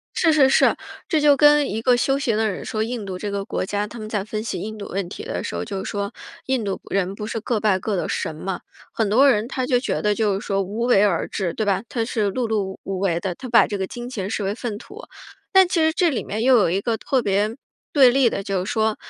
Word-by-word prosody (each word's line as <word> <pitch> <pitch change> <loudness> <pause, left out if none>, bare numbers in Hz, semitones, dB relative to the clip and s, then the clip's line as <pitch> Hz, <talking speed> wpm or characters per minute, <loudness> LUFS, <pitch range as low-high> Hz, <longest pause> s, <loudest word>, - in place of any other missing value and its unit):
是 325 - +3
是 285 -4 +5
是， - - +4 0.3
这 315 -4 +2
就 290 -1 +5
跟 295 0 +5
一 220 - -2
个 245 +1 +3
修 270 +3 +1
行 235 -6 0
的 220 -1 +1
人 190 - -6
说， 215 - -2
印 225 -2 -4
度 185 -1 -5
这 205 +2 -4
个 200 0 -3
国 200 - -3
家， 205 +2 -2
他 235 +2 -10
们 215 0 -7
在 205 -3 -2
分 215 0 -4
析 230 - -4
印 220 +1 -5
度 205 - -7
问 190 -1 -3
题 415 - -8
的 - - -4
时 - - -5
候， - - -2
就 195 -2 -5
是 - - -4
说， 200 0 -3 0.3
印 260 -4 0
度 195 -2 -3
人 195 -1 0
不 210 +1 -6
是 225 +1 -3
各 225 -1 -1
拜 205 -3 +2
各 200 +1 -2
的 - - -2
神 155 - -2
嘛， 185 +4 -4 0.3
很 220 -3 0
多 260 +7 +5
人 220 -2 +1
他 260 -1 -2
就 250 -1 +3
觉 260 - -2
得 210 0 +2
就 210 -2 +1
是 - - -9
说 195 0 0
无 205 +4 -5
为 240 -5 +4
而 195 -5 +1
治， 180 -4 -3
对 220 - -1
吧， 200 -2 +1
他 230 -2 -1
是 215 -3 -1
碌 235 +3 -2
碌 200 -3 -1
无 195 -1 -4
为 175 -3 0
的， 180 -1 -3
他 255 +5 -9
把 235 -1 +5
这 205 - -4
个 190 - -2
金 240 +3 -7
钱 195 -6 -4
视 215 0 -2
为 195 +1 -1
粪 230 -2 -4
土。 405 - -12 0.5
但 380 -1 +6
其 350 - +1
实 315 0 +3
这 345 0 +2
里 255 - -2
面 215 +2 -4
又 255 +1 +5
有 190 - +3
一 190 +3 0
个 225 +1 -1
特 260 +1 0
别 205 +3 0 0.4
对 265 -4 +7
立 255 -2 +3
的 - - -3
就 190 -2 -1
是 200 - -4
说- 220 -1 +1
215 Hz, 300 characters per minute, -22 LUFS, 195-250 Hz, 0.5 s, 对